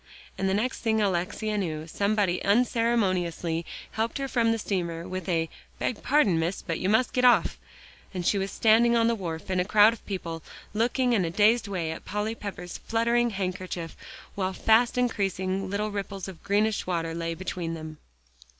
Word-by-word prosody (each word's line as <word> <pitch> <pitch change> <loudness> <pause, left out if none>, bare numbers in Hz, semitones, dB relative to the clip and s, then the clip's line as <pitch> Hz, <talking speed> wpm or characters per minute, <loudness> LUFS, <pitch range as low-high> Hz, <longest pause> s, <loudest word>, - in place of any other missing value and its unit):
And 190 0 0
the 190 - +2
next 245 +5 -1
thing 220 -1 +1
Alexia 205 +2 0
knew 155 -5 -3
somebody 200 +1 0
unceremoniously 195 -8 +1 0.2
helped 225 +4 -1
her 275 -1 -2
from 235 -3 +2
the 225 - +1
steamer 170 -6 -3
with 185 -1 -5
a 165 -2 +1 0.3
"Beg 240 - -2
pardon, 235 - +3
Miss, 170 +4 -2
but 165 -2 -3
you 185 - 0
must 220 +4 +2
get 250 - +1
off," 245 -1 +4 0.5
and 180 -3 -4
she 200 - +2
was 195 0 -2
standing 230 +2 +4
on 230 -1 +4
the 235 - +3
wharf 175 -4 -5
in 185 - +1
a - - +3
crowd 210 +3 +6
of 230 - -12
people, 170 -5 -4 0.3
looking 245 +3 +1
in 205 -5 +3
a 165 - -1
dazed 215 +5 +3
way 175 -5 -2
at 160 - -7
Polly 210 +2 -2
Pepper's 190 -5 -7
fluttering 235 +1 +1
handkerchief, 185 -4 -4 0.4
while 190 -1 -2
fast 230 +5 +3
increasing 195 -5 0
little 210 +2 -1
ripples 200 -1 -4
of 185 -4 -10
greenish 205 +1 +1
water 165 -2 -1
lay 165 0 -3
between 175 -1 -4
them. 155 -1 -8
200 Hz, 180 wpm, -27 LUFS, 175-225 Hz, 0.5 s, crowd